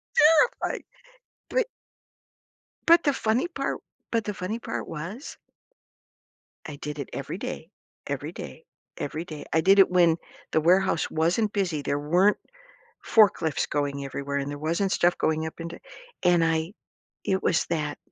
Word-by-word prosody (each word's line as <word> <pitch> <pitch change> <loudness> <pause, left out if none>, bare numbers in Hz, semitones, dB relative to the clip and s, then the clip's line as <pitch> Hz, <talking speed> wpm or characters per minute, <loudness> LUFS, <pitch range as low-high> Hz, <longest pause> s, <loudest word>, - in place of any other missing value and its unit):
Terrifying, 325 +4 +4 0.7
but - - +2 1.2
But 335 0 +6
the 285 - +5
funny 245 +4 0
part 345 - -3 0.3
but 230 -2 0
the 210 -2 -3
funny 210 +6 -3
part - - -5
was 180 - -7 1.3
I 150 - -6
did 150 +1 -6
it 140 - -5
every - - -4
day - - -6 0.4
every - - -3
day 65 - -9 0.3
every 155 +3 -4
day, 155 -3 -8
I 160 - +4
did 195 +3 +5
it 195 -2 +6
when 170 -2 +4 0.3
the - - +3
warehouse 180 0 +3
wasn't 175 +7 +1
busy, 180 -8 -1
there 140 +1 -1
weren't 180 +8 +3 0.6
forklifts 190 -8 +3
going 140 -1 -2
everywhere, 140 +1 -4
and 140 0 -1
there 145 - -5
wasn't 170 +6 0
stuff 175 0 +3
going 160 0 0
up 160 +1 -7
into 170 +1 -7 0.4
and 175 -2 +4
I 165 +3 0 0.5
it 190 0 0
was 160 - +2
that 150 -3 -2
170 Hz, 150 wpm, -26 LUFS, 150-200 Hz, 1.3 s, But